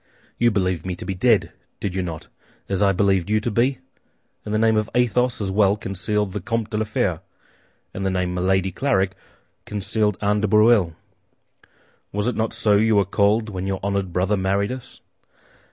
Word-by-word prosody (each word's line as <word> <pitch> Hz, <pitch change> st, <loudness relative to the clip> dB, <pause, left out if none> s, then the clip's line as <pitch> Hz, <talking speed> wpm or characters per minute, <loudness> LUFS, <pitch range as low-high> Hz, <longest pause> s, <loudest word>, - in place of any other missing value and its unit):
"You 120 Hz, -, +4 dB
believed 95 Hz, -5 st, -1 dB
me 95 Hz, -1 st, -3 dB
to 90 Hz, -, -8 dB
be 95 Hz, -, -2 dB
dead, 90 Hz, -, +2 dB, 0.3 s
did 100 Hz, -, -3 dB
you 95 Hz, -, -1 dB
not, 85 Hz, -3 st, -5 dB, 0.4 s
as 100 Hz, 0 st, -1 dB
I 100 Hz, -1 st, +4 dB
believed 95 Hz, -1 st, +1 dB
you 110 Hz, 0 st, +3 dB
to 120 Hz, -, -2 dB
be? 125 Hz, +5 st, +1 dB, 0.7 s
And 105 Hz, -, -6 dB
the 110 Hz, -, +1 dB
name 110 Hz, 0 st, +3 dB
of 110 Hz, 0 st, 0 dB
Athos 125 Hz, +1 st, +2 dB
as 100 Hz, -2 st, -2 dB
well 100 Hz, 0 st, +3 dB
concealed 105 Hz, +1 st, -2 dB
the 100 Hz, +1 st, -4 dB
Comte 115 Hz, +3 st, -2 dB
de 105 Hz, -, -1 dB
la 110 Hz, -, 0 dB
Fère, 105 Hz, -, -1 dB, 0.7 s
as 95 Hz, -, -5 dB
the 95 Hz, -, 0 dB
name 90 Hz, -1 st, -1 dB
Milady 95 Hz, +1 st, +1 dB
Clarik 100 Hz, -4 st, +1 dB, 0.5 s
concealed 105 Hz, 0 st, -1 dB
Anne 105 Hz, 0 st, +1 dB
de 105 Hz, -, +1 dB
Breuil. 105 Hz, -5 st, +4 dB, 1.2 s
Was 105 Hz, +1 st, -1 dB
it 125 Hz, -, 0 dB
not 110 Hz, 0 st, -1 dB
so 105 Hz, -2 st, +2 dB
you 110 Hz, +1 st, +3 dB
were 100 Hz, -1 st, +4 dB
called 105 Hz, +3 st, +1 dB
when 95 Hz, -2 st, -4 dB
your 95 Hz, -1 st, -2 dB
honored 100 Hz, -2 st, -1 dB
brother 95 Hz, +4 st, +1 dB
married 100 Hz, +2 st, 0 dB
us? 130 Hz, -1 st, -9 dB
100 Hz, 190 wpm, -22 LUFS, 95-110 Hz, 1.2 s, You